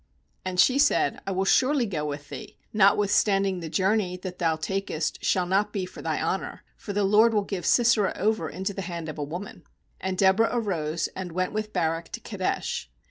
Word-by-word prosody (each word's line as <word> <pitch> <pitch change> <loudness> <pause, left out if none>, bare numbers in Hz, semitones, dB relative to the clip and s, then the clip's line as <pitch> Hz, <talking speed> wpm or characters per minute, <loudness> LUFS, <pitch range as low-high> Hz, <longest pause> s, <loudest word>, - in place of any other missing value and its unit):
9And 185 -1 -3
she 255 +9 +5
said: 290 0 +2
'I - - -1
will 190 +1 0
surely 260 +4 +3
go 170 -8 -3
with 145 0 -6
thee; - - -9 0.2
notwithstanding 195 -1 +3
the 165 -2 -6
journey 185 +2 +1
that 180 0 -7
thou 165 -2 +2
takest 160 -1 -3
shall 180 -1 +2
not 195 +3 +1
be 195 -3 -2
for 185 - -11
thy - - -1
honour; - - -3
for 205 - -7
the 205 0 0
LORD 215 +3 +5
will 205 - +2
give 190 -4 -4
Sisera 235 -5 +4
over 215 +3 0
into 190 +2 -4
the 195 - -4
hand 170 -3 -5
of 155 - -7
a - - -1
woman/ 175 +5 -7 0.4
And 190 0 -3
Deborah 195 +4 +4
arose, 170 -9 -1
and 180 -3 -6
went 185 +2 -1
with 215 0 -3
Barak 165 -2 -1
to - - -4
Kedesh. - - -3
190 Hz, 195 wpm, -26 LUFS, 175-210 Hz, 0.4 s, she